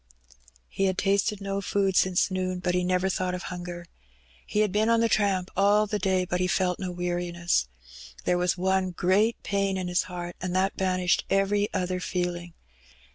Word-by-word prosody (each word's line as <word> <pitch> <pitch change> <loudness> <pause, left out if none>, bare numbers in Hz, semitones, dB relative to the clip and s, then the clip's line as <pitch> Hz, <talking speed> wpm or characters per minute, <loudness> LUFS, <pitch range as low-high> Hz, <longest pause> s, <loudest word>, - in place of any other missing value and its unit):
He 195 - -1
had 190 -1 0
tasted 200 +1 +1
no 195 0 -2
food 195 -1 0
since 185 +1 +3
noon, 185 -1 -1
but 180 0 -1
he 180 0 +1
never 180 +1 +1
thought 185 -1 -1
of 180 - -6
hunger. 175 -1 -6 0.6
He 210 - +1
had 210 -2 +1
been 215 +3 +2
on 230 0 +4
the 230 - +3
tramp 195 -4 +1
all 205 +2 +4
the 210 0 -2
day, 190 -2 +1
but 180 0 -2
he 180 - +1
felt 180 0 0
no 185 -2 -3
weariness. 175 - -1 0.6
There 180 - +2
was 180 +1 +1
one 190 +1 +1
great 190 +6 +1
pain 195 -1 0
in 185 -1 -3
his 180 0 +2
heart, 175 -1 -6
and 180 0 -3
that 190 +1 +1
banished 185 -1 +1
every 205 +1 +1
other 185 -1 -1
feeling. 175 -2 -3
185 Hz, 185 wpm, -27 LUFS, 180-195 Hz, 0.6 s, on